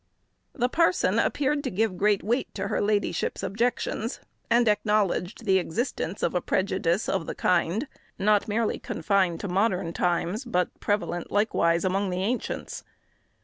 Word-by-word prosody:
The 245 - +1
parson 335 +6 +2
appeared 285 +1 +1
to 260 - -1
give 210 -1 0
great 205 +1 +2
weight 240 +5 0
to 195 -1 -3
her - - 0
ladyship's 205 0 0
objections, 230 +3 -1 0.3
and 235 0 +4
acknowledged 210 -1 +1
the 190 -2 +4
existence 190 - -3
of - - +1
a 180 - +1
prejudice 185 0 0
of 190 -4 -1
the - - -4
kind, 180 - +1 0.3
not 210 +1 +2
merely 220 +1 0
confined 190 -5 0
to - - -3
modern 185 -2 0
times, 180 +7 0
but 180 -8 0
prevalent 205 -4 -1
likewise 180 -5 +2
among 195 +1 0
the 180 +1 -2
ancients. 235 +5 -3
205 Hz, 145 wpm, -26 LUFS, 180-225 Hz, 0.3 s, and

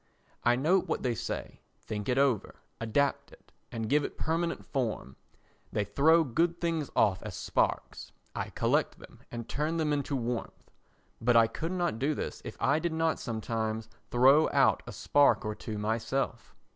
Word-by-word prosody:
I 120 0 +4
note 170 +9 +2
what - - -2
they 125 - +1
say, 115 - -5 0.2
think 105 0 -5
it 125 - +1
over, 135 -6 +1 0.2
adapt 135 +5 0
it - - -19 0.2
and 115 -1 -3
give 145 +5 +3
it - - -5
permanent 165 +1 -1
form. 115 - -3 0.6
They 105 - 0
throw 160 +8 +4
good 165 +6 0
things 165 -4 -1
off 95 -3 +3
as 105 -4 -7
sparks; - - -1 0.2
I - - -3
collect - - 0
them - - -15
and 120 -1 -6
turn 155 +3 -1
them 155 -2 +1
into 145 -1 -1
warmth. 120 -2 -4 0.5
But 120 +1 +3
I 115 -1 +7
could 160 +9 -4
not 175 -10 -1
do 145 +3 +1
this - - -5
if - - -8
I 140 +3 +2
did 170 0 -2
not 160 0 +1
sometimes 110 -1 -3 0.2
throw 135 +5 +5
out - - +3
a - - -5
spark 145 -5 +3
or 105 - -1
two 105 0 -6
myself. 115 +3 -2
130 Hz, 170 wpm, -30 LUFS, 115-155 Hz, 0.6 s, I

